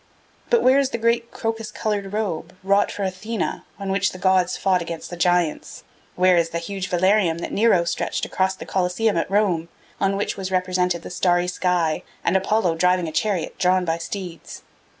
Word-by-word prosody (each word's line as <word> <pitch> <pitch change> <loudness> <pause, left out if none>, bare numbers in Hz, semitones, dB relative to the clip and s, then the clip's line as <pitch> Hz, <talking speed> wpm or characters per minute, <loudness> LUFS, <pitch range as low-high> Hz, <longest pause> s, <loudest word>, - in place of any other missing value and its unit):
But 475 - +3
where 260 +2 +5
is 275 -2 +1
the 235 - -3
great 235 +1 +1
crocus 225 -1 -3
coloured 205 -3 -2
robe, 185 -5 -3
wrought 200 +1 +3
for 205 - -4
Athena, 195 +4 -3
on 195 -1 -4
which 195 0 +1
the - - -8
gods 185 -1 +2
fought 185 -2 +2
against 170 0 -6
the - - -4
giants? 175 -2 0 0.3
Where 180 0 +4
is 165 -1 +2
the 170 - -3
huge 190 +2 -4
velarium 185 -1 +2
that - - -5
Nero 210 -5 +3
stretched 170 - -2
across 190 0 0
the - - -9
Colosseum 190 +4 0
at 165 - -1
Rome, 190 -5 +1 0.3
on 195 0 +1
which 205 - -2
was 190 -1 -4
represented 180 -2 0
the - - -8
starry 175 -1 +2
sky, 180 -3 0 0.2
and 170 - +1
Apollo 190 -3 +1
driving 180 0 +2
a - - -4
chariot 185 +1 -1
drawn 185 0 +3
by 165 0 -1
steeds? 180 -1 -7
185 Hz, 190 wpm, -22 LUFS, 175-200 Hz, 0.3 s, where